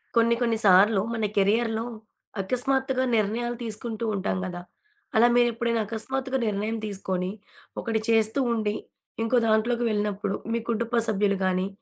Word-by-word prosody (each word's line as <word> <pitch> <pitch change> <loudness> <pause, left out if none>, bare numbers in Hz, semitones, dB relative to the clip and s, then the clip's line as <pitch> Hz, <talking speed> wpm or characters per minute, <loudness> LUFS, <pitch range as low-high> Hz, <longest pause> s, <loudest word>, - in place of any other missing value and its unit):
కొన్ని 230 0 +4
కొన్ని 230 -2 +2
సార్లు 195 +2 +6
మన 225 -2 -1
కెరియర్‌లో 220 +3 +2 0.6
అకస్మాత్తుగా 260 +4 0
నిర్ణయాలు 230 +3 0
తీసుకుంటూ 225 0 -4
ఉంటాం 190 -1 -1
గదా! 175 -1 -5 0.5
అలా 230 +2 +6
మీరెప్పుడైనా 235 -1 +2
అకస్మాత్తుగా 260 +5 -3
నిర్ణయం 210 +2 -1
తీసుకొని, 190 -2 -3 0.5
ఒకటి 225 -2 -1
చేస్తూ 225 +2 +3
ఉండి, 215 -2 -1 0.5
ఇంకో 225 +2 +2
దాంట్లోకి 230 +2 +2
వెళ్ళినప్పుడు 205 -1 -1 0.2
మీ 235 - +1
కుటుంబ 235 +1 0
సభ్యులు 200 -2 +1
గాని, 185 0 +1
220 Hz, 125 wpm, -26 LUFS, 205-235 Hz, 0.6 s, సార్లు